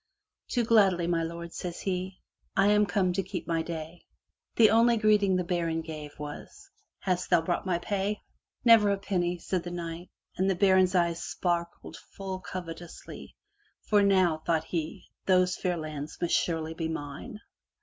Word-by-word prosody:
"Do 240 -2 +1
gladly, 195 -6 +4
my 170 -1 +1
lord,'* 170 +1 -5
says 175 -1 -5
he. 185 0 -3 0.4
"I 195 +1 +5
am 210 0 +4
come 185 -1 +1
to 195 - 0
keep - - -5
my 165 -1 +1
day.'* 160 +1 -6 0.5
The 220 -3 +6
only 230 +1 +5
greeting 210 -3 +3
the 180 - +1
baron 170 -2 -1
gave, 155 -2 -8
was, 390 - -9 0.3
"Hast 180 -1 -1
thou - - +5
brought 175 +2 -1
my 180 -2 +2
pay? 200 +3 -2 0.4
"Never 225 -3 +7
a 200 - +2
penny, 180 -3 -1
said 180 +1 -2
the 175 - -6
knight 170 0 -6 0.3
and 190 +1 +2
the 190 - +2
baron*s 190 0 +4
eyes 170 -1 +1
sparkled 170 -1 -3
full 190 -1 -7
covetously. 175 -2 -8 0.5
"For 210 -1 +3
now, 185 -5 +3
thought 160 0 0
he, 160 -1 -4 0.2
"those 185 -1 +4
fair 180 -1 -1
lands 155 -2 -6
must 175 - 0
surely 160 -2 0
be 165 0 -3
mine. 150 +5 -6
180 Hz, 165 wpm, -28 LUFS, 165-195 Hz, 0.5 s, Never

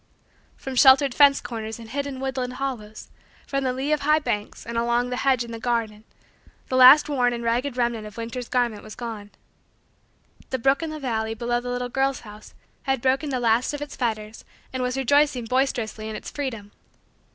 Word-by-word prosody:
From 265 - -6
sheltered 265 +1 +6
fence 280 0 +6
corners 220 -2 -6
and 230 -1 -11
hidden 280 0 -3
woodland 260 -1 -3
hollows, 240 -5 -5 0.4
from 275 -1 -2
the 260 - +1
lee 265 +4 -2
of 300 - +1
high 305 +2 +4
banks, 210 -9 -3
and 235 - -6
along 240 +1 +1
the 250 - -2
hedge 260 -2 +2
in 235 - -9
the 230 - -6
garden, 225 -3 -2 0.6
the 255 - -1
last 260 +4 +8
worn 250 -4 +1
and 235 0 -5
ragged 245 +3 -1
remnant 235 -3 -1
of 210 - -13
winter's 235 +1 -5
garment 240 -4 0
was 215 - -11
gone. 220 -4 -7 1.2
The 260 - -1
brook 270 +4 +2
in 325 - -3
the 310 0 -6
valley, 225 -4 -2
below 240 +1 -1
the 245 - -6
little 245 0 -2
girl's 270 +1 0
house, 210 -1 -13 0.3
had 270 - +2
broken 270 +4 +1
the 260 -2 -1
last 235 +4 +1
of 290 - -7
its 290 - -9
fetters 220 -3 -3 0.3
and 260 - -2
was 250 +1 -1
rejoicing 270 -1 +2
boisterously 225 -3 -1
in 215 - -5
its - - -7
freedom. 230 -8 -5
245 Hz, 195 wpm, -24 LUFS, 230-270 Hz, 1.2 s, last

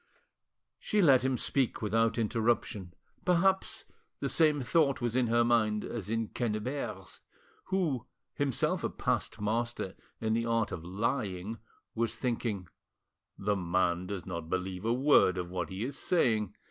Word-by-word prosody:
She 210 - 0
let 135 -9 +6
him 130 -1 +1
speak 135 -1 +1
without 115 +2 +1
interruption; 110 -5 0 0.3
perhaps 185 +2 +2 0.3
the - - -1
same 155 -3 +4
thought 140 0 +2
was 120 -1 -1
in 130 -2 +3
her 120 +1 +4
mind 110 -3 +2
as 110 -4 -5
in 115 -1 -1
Quennebert's, 110 -3 -3 0.5
who, 160 - -1 0.3
himself 140 -4 0
a - - +1
past - - -2
master 110 -2 -1 0.3
in 110 -1 0
the 115 +1 0
art 115 -1 +1
of 80 - -5
lying; 105 +1 -2 0.3
was 115 0 -1
thinking— 115 -6 -2 0.7
"The 105 +1 0
man 90 -1 0
does 100 -2 -5
not 85 -3 -5
believe 95 +1 -3
a 115 - +2
word 125 -7 +4
of 90 -1 -4
what 90 -3 -2
he 95 +3 -4
is 135 +3 -4
saying." 110 - +1
115 Hz, 145 wpm, -31 LUFS, 95-125 Hz, 0.7 s, let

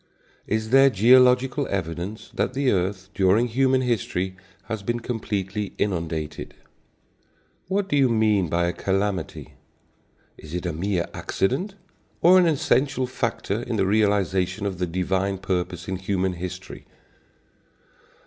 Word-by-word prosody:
Is 110 +1 -1
there 135 +1 +7
geological 125 +5 +4
evidence 95 +3 -4
that 125 - -1
the 135 -1 +2
earth, 95 0 -1
during 100 +5 +3
human 130 +2 +2
history, 95 -6 -1 0.3
has 110 0 -5
been 120 +4 -2
completely 105 -4 -3
inundated? 80 -6 -3 1.1
What 195 +1 0
do 165 - 0
you 135 -3 +4
mean 105 -6 +2
by 85 +2 +1
a 85 - -1
calamity? 95 -3 -2 0.9
Is 80 +2 -8
it 90 - -3
a 85 - -2
mere 90 +2 -1
accident, 165 - -1 0.4
or 185 +2 +7
an 180 - +4
essential 135 -3 +1
factor 115 -4 -2
in 120 -1 -3
the 100 -3 +1
realization 100 -1 +1
of 95 -3 -3
the 90 - 0
divine 95 +3 -1
purpose 90 -1 -3
in 95 0 -2
human 95 0 -1
history? 90 +1 -8
100 Hz, 130 wpm, -24 LUFS, 90-125 Hz, 1.1 s, there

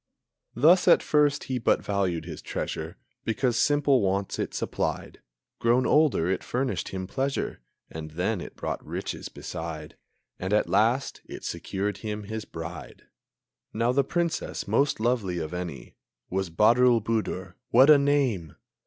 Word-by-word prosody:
Thus 160 +10 +5
at - - +6
first 150 -1 +2
he 130 -2 -2
but 115 - +2
valued 95 -5 -1
his - - -7
treasure - - -4 0.3
Because 120 +1 0
simple 145 0 +3
wants 100 0 -1
it - - -2
supplied. - - -3 0.4
Grown 120 +2 +3
older 150 - +3
it 95 - -1
furnished 130 +1 -2
him 95 -1 -4
pleasure; 135 - -2 0.3
And 80 -1 -7
then 90 +5 -1
it - - -9
brought - - -4
riches - - -5
beside; 80 -2 -7 0.4
And, 95 +3 -2
at 105 - +3
last, 115 +7 +1
it - - -9
secured 100 +1 -3
him 105 0 -5
his 110 +1 -5
bride. 80 +1 -8 0.7
Now 115 +2 +1
the 140 +2 +3
Princess 170 +3 -2
most 140 -4 +2
lovely 110 -6 0
of 80 0 -4
any 90 -5 -6 0.4
Was 95 -1 -1
Badroulboudour, 110 -2 +2 0.2
(what 130 +5 +7
a 145 - +8
name!) 130 - +1
110 Hz, 145 wpm, -27 LUFS, 95-130 Hz, 0.7 s, a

